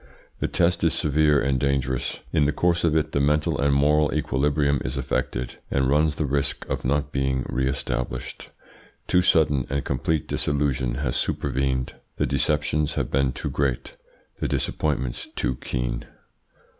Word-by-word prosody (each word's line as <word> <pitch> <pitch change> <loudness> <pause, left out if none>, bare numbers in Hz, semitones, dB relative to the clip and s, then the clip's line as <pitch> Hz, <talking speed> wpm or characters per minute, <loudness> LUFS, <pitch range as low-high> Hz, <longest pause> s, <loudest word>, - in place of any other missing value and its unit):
The - - 0
test 85 0 +1
is 80 - +4
severe 75 -1 +3
and 70 -1 +1
dangerous. 65 -2 -1
In 75 -3 +3
the 75 - +2
course 85 +3 +1
of 80 -2 +2
it 80 - +1
the - - 0
mental 75 +2 +1
and 70 0 +3
moral 75 +2 +3
equilibrium 70 -1 +1
is 65 +2 -4
affected, 60 -1 -2
and 65 -1 +1
runs 75 +2 +2
the 75 - -1
risk 70 0 0
of - - -3
not 70 +2 0
being 65 -1 0
re 65 0 0
established. 60 -2 -3 0.6
Too 90 - +3
sudden 75 -7 +3
and 70 0 -1
complete 75 +4 -1
disillusion 70 -4 0
has 65 -2 -2
supervened. 65 -1 -1 0.2
The - - +1
deceptions 75 +2 +1
have - - -2
been 70 -1 +2
too - - -5
great, 70 -3 -1 0.4
the - - -1
disappointments 65 -5 -1
too - - -2
keen." - - -3
70 Hz, 155 wpm, -24 LUFS, 65-75 Hz, 0.6 s, is